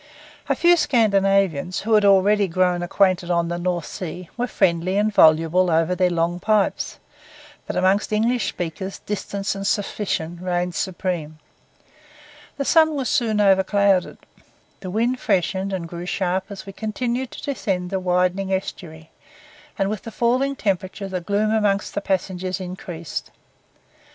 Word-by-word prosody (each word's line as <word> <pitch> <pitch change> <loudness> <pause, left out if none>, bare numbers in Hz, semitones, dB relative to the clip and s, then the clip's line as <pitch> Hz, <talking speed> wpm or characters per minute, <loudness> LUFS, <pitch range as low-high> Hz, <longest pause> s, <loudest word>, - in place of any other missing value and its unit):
A - - +3
few 345 0 +5
Scandinavians, 195 - +2
who 225 +2 -1
had 210 -1 +5
already 200 +1 +4
grown 180 0 +1
acquainted 180 0 +1
on 170 -1 +1
the 175 0 -3
North 175 -2 -1
Sea, 180 0 -7
were 245 0 -1
friendly 180 -2 +1
and 210 +1 +1
voluble 165 +2 +5
over 165 +2 +2
their 180 0 +2
long 170 0 -1
pipes; 210 +1 0 0.7
but - - -4
among 190 +2 +3
English 225 +3 +1
speakers 180 +3 -5
distance 200 -1 -3
and 195 0 -4
suspicion 190 -5 -2
reigned 180 -1 -1
supreme. 175 -4 -3 1.2
The 280 - -2
sun 315 0 +4
was 270 -3 -2
soon 220 -3 +1
overclouded, 195 -1 +3 0.6
the 185 - -7
wind 235 +6 0
freshened 190 0 0
and 180 -3 -3
grew 175 +1 -7
sharp 185 0 -1
as 195 -2 -8
we 195 - -9
continued 235 +4 -3
to - - -10
descend 190 -10 -2
the 190 - 0
widening 185 +1 0
estuary; 160 -4 -5 0.7
and 195 - +1
with 210 0 -3
the - - -8
falling 255 +5 +1
temperature 195 -2 -2
the 185 -1 -3
gloom 205 +4 0
among 210 -3 +2
the 200 - -2
passengers 185 -1 -2
increased. 180 -3 -6
190 Hz, 145 wpm, -22 LUFS, 180-210 Hz, 1.2 s, few